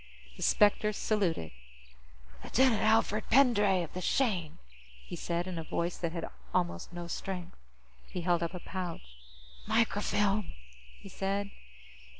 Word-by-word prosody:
The - - -11
specter 210 +1 +4
saluted. 190 - 0 0.9
"Lieutenant 255 -4 +3
Alfred 220 -1 +3
Pendray, 210 -8 +5
of 165 - -8
the 185 - -4
Shane," 185 - 0 0.5
he - - -6
said, 170 +1 -2
in 180 -3 -4
a - - -4
voice 170 +2 -2
that 170 -2 -1
had 165 -1 -4 0.3
almost 85 - -1
no 175 0 -6
strength. 180 +1 -5 0.5
He 180 - -5
held 175 0 +2
up 170 +2 -2
a - - -4
pouch. 170 - -6 0.5
"Microfilm," 205 -2 +1 0.5
he - - -12
said. 195 +1 -2
185 Hz, 135 wpm, -31 LUFS, 170-210 Hz, 0.9 s, Pendray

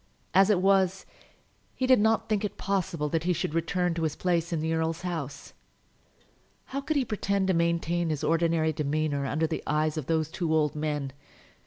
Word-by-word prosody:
As 195 +1 +5
it 195 -4 +3
was, 195 -1 +3 0.7
he 260 - -1
did 255 -2 +5
not 220 +1 +2
think 215 -1 0
it 210 - -3
possible 190 -6 -1
that 165 +1 -1
he 180 - +2
should 150 - -2
return 175 +1 0
to 165 - -3
his 155 -2 -1
place 175 -1 0
in 165 - 0
the 160 +1 -1
earl's 160 +1 -1
house. 165 -6 -5 1.2
How 275 - -1
could 310 +3 -2
he 270 - +1
pretend 200 -3 -1
to - - +4
maintain 170 0 0
his 155 -1 -2
ordinary 165 0 +2
demeanour 150 -1 -1
under 155 +4 0
the 160 0 -3
eyes 155 +1 0
of 155 - -4
those 160 -1 0
two 165 -2 -2
old 150 -2 +2
men? 150 -3 -2
165 Hz, 190 wpm, -28 LUFS, 155-190 Hz, 1.2 s, As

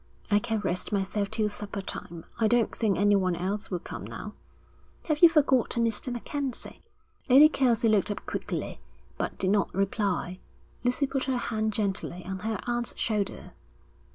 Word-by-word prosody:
'I 205 - +5
can 225 0 -1
rest 180 -2 -1
myself 200 0 -1
till 220 0 +1
supper 205 -1 -4
time. 170 -3 -6
I 225 - +4
don't 235 0 +2
think 215 -4 +1
anyone 195 -3 +3
else 200 +5 -3
will 180 - -1
come - - -8
now.' - - -7 0.7
'Have 305 -2 0
you 340 - +9
forgotten 260 -6 +3
Mr. 230 +3 -2
MacKenzie?' 260 +2 -5 0.5
Lady 275 +4 +9
Kelsey 245 -6 +2
looked 215 -3 +3
up 205 - -4
quickly, - - -4 0.4
but - - -2
did 185 - +1
not 205 -1 +2
reply. 195 -2 -1 0.4
Lucy 250 +3 +2
put 270 -1 -2
her 260 -1 0
hand 220 -2 -1
gently 195 -4 -2
on 190 0 -4
her 220 0 -2
aunt's 240 0 -1
shoulder. 210 -3 -1
215 Hz, 160 wpm, -28 LUFS, 195-240 Hz, 0.7 s, you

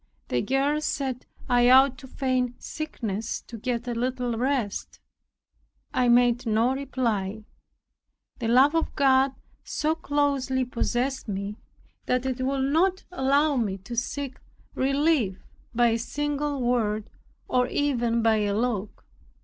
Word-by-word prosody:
The 125 - +1
girls 285 +3 0
said, 260 -3 -3 0.2
"I 245 -1 +4
ought 260 0 +6
to 265 - -11
feign 255 -2 -1
sickness, 225 -9 -4
to 235 - -10
get 240 +1 -3
a 240 - -1
little 245 0 -1
rest." 245 -3 -2 0.9
I 250 -1 +2
made 240 0 +4
no 225 +4 +2
reply. 225 -7 -2 1.0
The 235 - -2
love 260 +6 +5
of 330 0 -1
God 270 -1 +4 0.3
so 310 +1 0
closely 280 -4 0
possessed 250 +2 -1
me, 200 +1 -4 0.5
that 250 0 +1
it 260 -1 -2
would 270 0 0
not 375 +4 +2
allow 285 -2 +2
me 205 -5 -1
to 195 +5 -8
seek 265 +3 -3 0.3
relief 275 - +1 0.3
by 240 0 +3
a 230 0 0
single 290 +3 -2
word, 220 -3 0 0.4
or 250 0 +2
even 240 -6 0
by 225 -1 +4
a 205 -1 0
look. 215 -3 -2
250 Hz, 135 wpm, -26 LUFS, 230-275 Hz, 1.0 s, ought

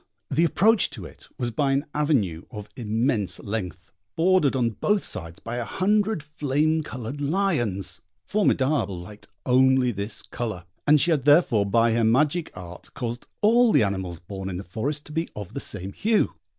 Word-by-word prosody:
The 160 +5 +3
approach 210 +5 +3
to 95 - -7
it - - -14
was 120 -1 -2
by 135 +4 +1
an 140 +2 0
avenue 115 - 0
of 105 -4 -8
immense 110 - -1
length, 95 -5 -5 0.2
bordered 170 -5 +3
on 120 -3 +1
both 210 - 0
sides 80 0 -5
by 115 +1 -5
a 120 - -1
hundred 200 - +1
flame 150 +1 0
coloured 130 -1 -6
lions. 140 - 0 0.2
Formidable 140 - +1
liked 100 +4 -11 0.2
only 130 0 +4
this 100 +1 -4
colour, 110 -8 -5 0.2
and 150 0 +6
she 170 - +2
had 145 -5 +1
therefore 145 - +4
by 115 +3 +3
her 115 0 +2
magic 150 +9 +2
art 90 -1 -10
caused 120 0 -5
all 230 +2 +5
the - - +5
animals 95 -4 -3
born 95 +2 -6
in 90 - -4
the 95 - -6
forest 135 - -4
to - - -11
be 165 +2 -2
of 105 -4 -7
the - - -3
same 95 0 -6
hue. 220 0 +1
125 Hz, 175 wpm, -25 LUFS, 100-155 Hz, 0.2 s, and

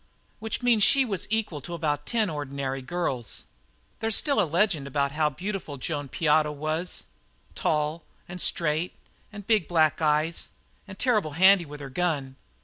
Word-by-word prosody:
Which 220 +3 -4
means 235 -3 +4
she 270 +5 +5
was 200 -7 -3
equal 215 -9 -1
to 175 +5 -6
about 150 -3 -1
ten 225 -3 +1
ordinary 140 -4 -3
girls. 130 -6 -3 0.6
There's 225 -1 +1
still 280 -8 +3
a 175 - 0
legend 170 -4 +1
about 140 0 0
how 150 +1 +1
beautiful 180 -1 -5
Joan 145 +1 -3
Piotto 150 +1 +2
was 155 +4 -3 0.5
tall 150 +1 0 0.3
and 175 0 -6
straight 165 +1 0 0.4
and 205 -2 -9
big 215 -7 +2
black 160 -2 +3
eyes 155 +2 +1 0.4
and 190 -1 -10
terrible 210 - +1
handy 190 +2 +6
with 145 0 -9
her 135 -1 -7
gun. 145 -5 -1
160 Hz, 155 wpm, -27 LUFS, 145-195 Hz, 0.6 s, handy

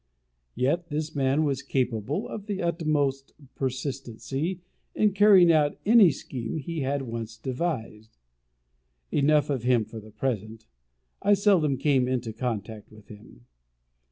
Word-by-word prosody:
Yet 145 +8 0
this 155 +1 -3
man 135 +2 +2
was 140 -3 -1
capable 130 - -2
of 210 -1 -8
the 200 -2 -3
utmost 150 -6 -1 0.2
persistency 135 +5 -4 0.4
in 210 -1 +3
carrying 195 -4 +6
out 150 -2 +2
any 215 -3 +7
scheme 130 -2 -5
he 160 +2 -4
had 140 0 -1
once 115 -2 -6
devised. 115 - -4 0.9
Enough 145 0 +3
of 135 -4 -1
him 120 -2 +2
for 110 +1 -9
the 110 0 -13
present: 110 -2 -4 0.6
I 205 +1 +4
seldom 185 -9 +3
came 135 -3 +2
into 120 -3 -2
contact 110 -3 -5
with 105 -2 -17
him. 110 +3 -15
135 Hz, 130 wpm, -26 LUFS, 115-160 Hz, 0.9 s, any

